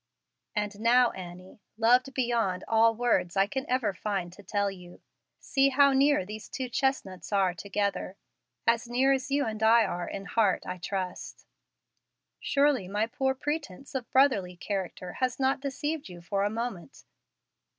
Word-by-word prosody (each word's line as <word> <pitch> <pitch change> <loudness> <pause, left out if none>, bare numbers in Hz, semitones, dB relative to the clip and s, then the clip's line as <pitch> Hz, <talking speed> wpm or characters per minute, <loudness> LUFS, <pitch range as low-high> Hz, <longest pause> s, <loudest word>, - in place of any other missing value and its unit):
"And 210 -1 -2
now, 240 +2 +4
Annie, 180 +2 -10 0.2
loved 250 +4 +3
beyond 230 -7 0
all 225 0 +4
words 200 -7 +1
I 195 - +5
can 265 +6 -5
ever 250 -5 +1
find 190 -2 -3
to 205 - -13
tell 200 0 -1
you, 180 -2 -13 0.4
see 275 0 +2
how 280 +1 +5
near 275 -6 +3
these 215 +2 -8
two 260 -2 -4
chestnuts 225 -10 -2
are 195 -3 +2
together 200 +1 -3 0.5
as 230 0 +2
near 260 +3 +3
as 265 0 -2
you 285 +1 +1
and 220 -1 -4
I 225 +1 +6
are 175 0 -4
in 195 0 -6
heart, 210 -4 +1
I 180 0 -5
trust. 185 0 -5 0.9
Surely 280 -8 +2
my 205 +3 0
poor 265 +3 -1
pretence 290 - -5
of 260 -3 -4
brotherly 230 -10 +3
character 185 -2 -4
has 255 -1 0
not 265 +1 +2
deceived 285 0 -3
you 175 -1 -10
for 195 +4 -2
a 205 - +1
moment. 230 0 -5
225 Hz, 160 wpm, -28 LUFS, 190-265 Hz, 0.9 s, I